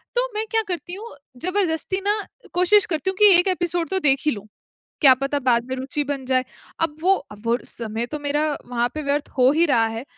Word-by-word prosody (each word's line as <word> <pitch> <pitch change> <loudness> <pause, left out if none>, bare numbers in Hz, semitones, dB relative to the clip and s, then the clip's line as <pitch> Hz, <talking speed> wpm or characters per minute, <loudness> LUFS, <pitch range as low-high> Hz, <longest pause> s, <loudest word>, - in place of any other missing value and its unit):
तो - - +2
मैं 430 +1 -1
क्या 450 -1 +3
करती 355 0 -4
हूँ 435 +1 -8 0.3
जबरदस्ती 370 0 -1
ना, 415 +1 +2 0.3
कोशिश 365 +3 +4
करती 325 +2 -2
हूँ 380 - -3
कि 415 -2 +8
एक 355 - +2
एपिसोड 350 -2 -1
तो 380 0 +1
देख 275 -4 +3
ही 300 - +3
लूँ। 205 -2 -7 0.5
क्या 275 -4 +8
पता 275 +2 -2
बाद 245 -3 +1
में 260 - -2
रुचि 265 +3 -2
बन 275 -2 -4
जाए। 255 0 +1 0.4
अब 325 -2 0
वो 375 +4 +4 0.2
अब 210 0 -13
वो 230 - +2
वो 240 - +2
समय 230 0 -4
तो 300 +3 -6
मेरा 290 +1 -1 0.2
वहाँ 240 -1 -1
पे 305 - -4
व्यर्थ 285 0 -1
हो 255 +1 +6
ही 325 +3 +3
रहा 235 -7 +3
है, 225 +2 -5
295 Hz, 230 wpm, -22 LUFS, 255-365 Hz, 0.5 s, कि